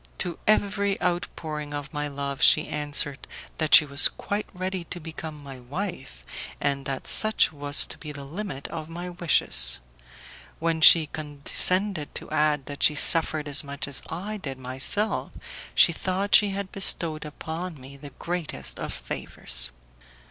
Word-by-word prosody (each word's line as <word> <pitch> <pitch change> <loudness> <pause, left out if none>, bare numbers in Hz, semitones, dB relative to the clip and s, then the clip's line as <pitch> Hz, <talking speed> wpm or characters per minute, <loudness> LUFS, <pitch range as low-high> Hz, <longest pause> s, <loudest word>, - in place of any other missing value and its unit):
To 175 -3 -3
every 200 -1 +1
outpouring 155 -4 -3
of 145 0 -7
my 150 0 -2
love 140 -1 -5
she 155 - +6
answered 145 -1 -1 0.3
that 155 -2 +6
she - - +8
was 140 +2 +4
quite 205 +1 -4
ready 185 0 -4
to 175 - -7
become 155 -2 -8
my 135 -2 -10
wife, 130 - -7 0.3
and 140 -1 -2
that 135 -1 -4
such 215 -6 +4
was 145 0 +3
to - - -6
be 150 - -7
the 145 -1 -9
limit 145 -1 -6
of 160 -1 -7
my 175 +2 -6
wishes; - - +1 0.8
when 165 0 -1
she 160 0 +9
condescended 155 +4 0
to - - -6
add 150 -2 +1
that 145 -1 -8
she 150 - +5
suffered 155 0 +3
as 145 +1 +2
much 140 0 -5
as 140 - 0
I 200 +6 -5
did 135 -9 -7
myself, 130 +12 0 0.4
she 170 - +5
thought 190 +4 -3
she 205 - +6
had 195 -1 -5
bestowed 165 -5 0
upon 160 +2 -7
me 135 +2 -12
the 140 +1 -11
greatest 170 +4 -5
of - - -5
favours. - - -2
155 Hz, 155 wpm, -25 LUFS, 140-180 Hz, 0.8 s, she